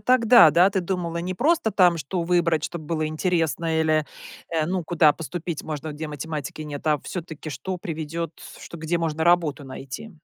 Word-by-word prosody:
тогда, 240 Hz, -7 st, +6 dB
да? 175 Hz, +6 st, +5 dB
Ты 195 Hz, -1 st, 0 dB
думала 175 Hz, -2 st, -3 dB
не 180 Hz, +2 st, -3 dB
просто 295 Hz, -, +2 dB
там, 180 Hz, -4 st, +4 dB
что 170 Hz, +5 st, -3 dB
выбрать, 165 Hz, -3 st, +1 dB
чтоб 170 Hz, -, -4 dB
было 155 Hz, 0 st, -2 dB
интересно 160 Hz, -1 st, 0 dB
или, 155 Hz, -1 st, +2 dB, 0.4 s
э, 160 Hz, -2 st, 0 dB
ну, 180 Hz, +1 st, -1 dB
куда 155 Hz, -3 st, +4 dB
поступить 165 Hz, 0 st, -5 dB
можно, 155 Hz, 0 st, -5 dB
где 155 Hz, +1 st, -6 dB
математики 150 Hz, 0 st, -5 dB
нет, 145 Hz, 0 st, -7 dB
а 150 Hz, -1 st, +3 dB
всё-таки 160 Hz, -2 st, -7 dB
что 145 Hz, +7 st, -4 dB
приведет, 165 Hz, -1 st, -4 dB, 0.3 s
что -, -, -10 dB
где 160 Hz, +2 st, -1 dB
можно 160 Hz, -1 st, -1 dB
работу 165 Hz, -4 st, +2 dB
найти? 135 Hz, -, -8 dB
165 Hz, 175 wpm, -24 LUFS, 155-175 Hz, 0.4 s, тогда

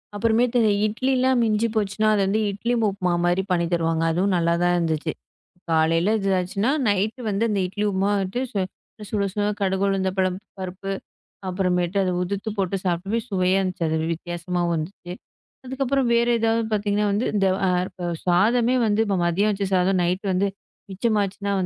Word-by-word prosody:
அப்புறமேட்டு 230 Hz, +3 st, +2 dB, 0.3 s
இட்லிலாம் 255 Hz, +3 st, +1 dB
மிஞ்சிப்போச்சுனா, 215 Hz, -1 st, 0 dB
அது 205 Hz, -, +1 dB
வந்து 215 Hz, +3 st, +1 dB
இட்லி 230 Hz, +5 st, -2 dB, 0.2 s
உப்புமா 185 Hz, -3 st, -1 dB
மாரி 175 Hz, +2 st, +2 dB
பண்ணி 170 Hz, -1 st, +2 dB
தருவாங்க. 165 Hz, -1 st, +1 dB
அதுவும் 185 Hz, +4 st, +1 dB
நல்லாதான் 170 Hz, +1 st, +2 dB
இருந்துச்சு. 160 Hz, -2 st, -1 dB, 0.6 s
காலையில 165 Hz, +5 st, +3 dB
இதாச்சுன்னா, 195 Hz, +4 st, 0 dB, 0.2 s
நைட் 205 Hz, +4 st, 0 dB
வந்து 200 Hz, +2 st, 0 dB
அந்த 205 Hz, -, 0 dB
இட்லி 205 Hz, +3 st, -4 dB
உப்புமா 195 Hz, +1 st, +1 dB
வந்துட்டு 195 Hz, +5 st, -2 dB
சு 200 Hz, -, 0 dB, 0.5 s
சுட 205 Hz, -2 st, 0 dB
சுட 205 Hz, -, -1 dB, 0.2 s
கடுகு, 190 Hz, 0 st, +1 dB
உளுந்தம் 190 Hz, -1 st, 0 dB
பருப்பு 185 Hz, 0 st, +1 dB, 0.2 s
பருப்பு. 185 Hz, +1 st, -5 dB, 0.6 s
அப்புறமேட்டு 180 Hz, 0 st, 0 dB
அத 190 Hz, -, +1 dB
உதிர்த்து 200 Hz, +4 st, -3 dB
போட்டுச் 195 Hz, 0 st, -1 dB
சாப்பிடவே 195 Hz, +6 st, -1 dB
சுவையா 185 Hz, -1 st, +2 dB
இருந்துச்சு 185 Hz, -2 st, -2 dB
அது. 160 Hz, -, 0 dB
வி -, -, -1 dB
வித்தியாசமா 175 Hz, +1 st, -4 dB
வந்துச்சு. 175 Hz, +2 st, -5 dB, 0.5 s
அதுக்கப்புறம் 265 Hz, 0 st, 0 dB
வேற 235 Hz, 0 st, +3 dB
ஏதாவது 225 Hz, 0 st, +1 dB
பாத்தீங்கன்னா, 205 Hz, 0 st, +1 dB, 0.3 s
இந்த 195 Hz, -1 st, +3 dB, 0.4 s
இப்ப 180 Hz, -, -7 dB, 0.2 s
சாதமே 230 Hz, +8 st, +3 dB
வந்து, 210 Hz, +1 st, +2 dB, 0.2 s
மதியம் 195 Hz, +5 st, +2 dB
வச்ச 200 Hz, 0 st, -2 dB
சாதம் 185 Hz, +1 st, +2 dB
நைட் 180 Hz, +3 st, -1 dB
வந்து 195 Hz, +2 st, +2 dB, 0.4 s
மிச்சம் 215 Hz, +3 st, 0 dB
ஆச்சுனா, 200 Hz, +1 st, -3 dB
195 Hz, 150 wpm, -23 LUFS, 180-215 Hz, 0.6 s, காலையில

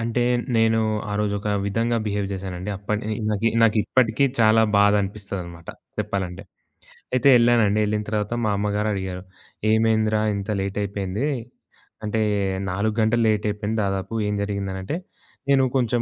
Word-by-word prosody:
అంటే 115 Hz, +1 st, 0 dB, 0.3 s
నేను 115 Hz, 0 st, +3 dB, 0.3 s
ఆ -, -, -2 dB
రోజొక 100 Hz, 0 st, -1 dB, 0.2 s
విధంగా 115 Hz, +4 st, 0 dB
బిహేవ్ 100 Hz, -1 st, -1 dB
జేశానండి. 95 Hz, 0 st, -5 dB
అప్పడి 105 Hz, +2 st, -3 dB, 0.2 s
నాకి 105 Hz, +2 st, +1 dB
నాకిప్పటికీ 115 Hz, +3 st, +3 dB, 0.2 s
చాలా 110 Hz, 0 st, +5 dB, 0.2 s
బాధనిపిస్తదనమాట 100 Hz, -4 st, 0 dB, 0.3 s
చెప్పాలంటే. 95 Hz, -1 st, -3 dB, 0.7 s
అయితే 130 Hz, +2 st, +3 dB
ఎళ్ళానండి. 115 Hz, -3 st, +3 dB
ఎళ్ళిన 105 Hz, 0 st, -1 dB
తర్వాత 105 Hz, +1 st, -1 dB
మా 105 Hz, -, +2 dB
అమ్మగారడిగారు. 100 Hz, -3 st, -2 dB, 0.5 s
ఏమైందిరా 110 Hz, -1 st, +2 dB
ఇంత 100 Hz, +1 st, -5 dB
లేటయిపోయింది, 100 Hz, +4 st, -2 dB, 0.8 s
అంటే 110 Hz, +1 st, 0 dB, 0.5 s
4 105 Hz, +3 st, -1 dB
గంటలు 115 Hz, +2 st, +2 dB
లేటయిపోయింది 105 Hz, +1 st, -1 dB
దాదాపు 95 Hz, +1 st, -3 dB
ఏం 105 Hz, -, -1 dB
జరిగిందనంటే, 100 Hz, +2 st, -3 dB, 0.5 s
నేను 135 Hz, -1 st, +5 dB
కొంచెం 120 Hz, -2 st, +1 dB
105 Hz, 115 wpm, -23 LUFS, 100-110 Hz, 0.8 s, చాలా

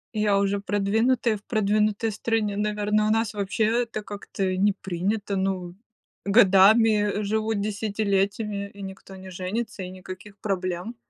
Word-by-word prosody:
Я 210 Hz, -2 st, +2 dB
уже 200 Hz, 0 st, +1 dB
продвинутая, 220 Hz, +3 st, +1 dB
в 200 Hz, -, -19 dB
продвинутой 215 Hz, 0 st, +1 dB
стране. 215 Hz, -1 st, -1 dB
Наверно, 210 Hz, 0 st, 0 dB
у -, -, +1 dB
нас 225 Hz, -1 st, +1 dB
вообще 205 Hz, +2 st, -1 dB, 0.2 s
это 230 Hz, -3 st, -4 dB
как-то 195 Hz, -2 st, -3 dB
не 205 Hz, +2 st, +3 dB
принято, 195 Hz, +2 st, -2 dB
ну, 190 Hz, -2 st, -2 dB, 0.5 s
годами 210 Hz, +1 st, +5 dB
живут 215 Hz, 0 st, -1 dB
десятилетиями, 200 Hz, -1 st, -1 dB
и 200 Hz, -, -9 dB
никто 195 Hz, 0 st, -9 dB
не 185 Hz, 0 st, -10 dB
женится, 190 Hz, +4 st, -4 dB
и 180 Hz, -, -5 dB
никаких 185 Hz, +2 st, -10 dB
проблем. 185 Hz, +2 st, -3 dB
205 Hz, 135 wpm, -25 LUFS, 195-215 Hz, 0.5 s, годами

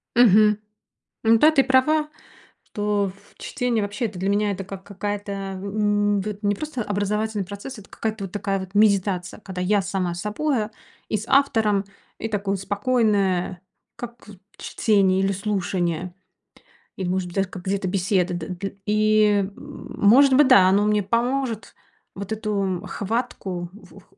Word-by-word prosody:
Мгм. 215 Hz, -3 st, +6 dB, 0.7 s
Ну 225 Hz, 0 st, +5 dB
да, 305 Hz, +6 st, +6 dB
ты 295 Hz, -4 st, +4 dB
права, 300 Hz, +4 st, +3 dB, 0.6 s
что 205 Hz, -2 st, -1 dB
в 195 Hz, -, -24 dB
чтение, 245 Hz, -4 st, -1 dB
вообще, 205 Hz, +4 st, -3 dB
это 200 Hz, -5 st, -5 dB
для 190 Hz, +2 st, -1 dB
меня 205 Hz, +1 st, +1 dB
это 195 Hz, 0 st, -4 dB
как 195 Hz, 0 st, -9 dB
какая-то, 205 Hz, +1 st, -4 dB
м, 200 Hz, +1 st, 0 dB
вот 210 Hz, +1 st, -6 dB
не 205 Hz, 0 st, +2 dB
просто 300 Hz, -2 st, -4 dB
образовательный 205 Hz, 0 st, -1 dB
процесс, 205 Hz, +6 st, -8 dB
это 200 Hz, -, -16 dB
какая-то 220 Hz, -2 st, -4 dB
вот 185 Hz, -, -10 dB
такая 200 Hz, -1 st, -1 dB
вот 190 Hz, 0 st, -8 dB
медитация, 195 Hz, -3 st, +2 dB
когда 190 Hz, -3 st, -6 dB
я 200 Hz, +2 st, +2 dB
сама 185 Hz, -2 st, -2 dB
с 175 Hz, -, -6 dB
собой, 230 Hz, +3 st, -1 dB
а, 215 Hz, -, -12 dB, 0.4 s
и 215 Hz, -, +1 dB
с 215 Hz, -, -7 dB
автором, 220 Hz, -8 st, +3 dB, 0.3 s
и 225 Hz, -, -3 dB
такое 200 Hz, -2 st, -1 dB
спокойное, 200 Hz, -3 st, 0 dB, 0.3 s
как 240 Hz, -1 st, -9 dB
вот 205 Hz, -3 st, -13 dB, 0.2 s
чтение 195 Hz, -4 st, +2 dB
или 195 Hz, 0 st, +1 dB
слушание, 185 Hz, -3 st, -2 dB, 0.8 s
или, 190 Hz, -, -3 dB
может 185 Hz, 0 st, -1 dB
быть, 175 Hz, -, -11 dB
даже 195 Hz, -1 st, 0 dB
как 185 Hz, -1 st, -9 dB
где-то 195 Hz, 0 st, -1 dB
беседа, 185 Hz, -1 st, +1 dB
да 175 Hz, -2 st, -4 dB
дл 185 Hz, +2 st, -4 dB, 0.2 s
и, 215 Hz, 0 st, +3 dB, 0.3 s
м, -, -, -10 dB
может 265 Hz, +7 st, +6 dB
быть, 290 Hz, 0 st, +6 dB
да, 195 Hz, -8 st, +7 dB
оно 200 Hz, +2 st, +3 dB
мне 210 Hz, -1 st, +2 dB
поможет 235 Hz, 0 st, -1 dB, 0.4 s
вот 200 Hz, +2 st, -7 dB
эту 200 Hz, -4 st, -2 dB
хватку, 200 Hz, -5 st, -3 dB
в 185 Hz, -5 st, -15 dB
в -, -, -21 dB
205 Hz, 165 wpm, -23 LUFS, 190-220 Hz, 0.8 s, да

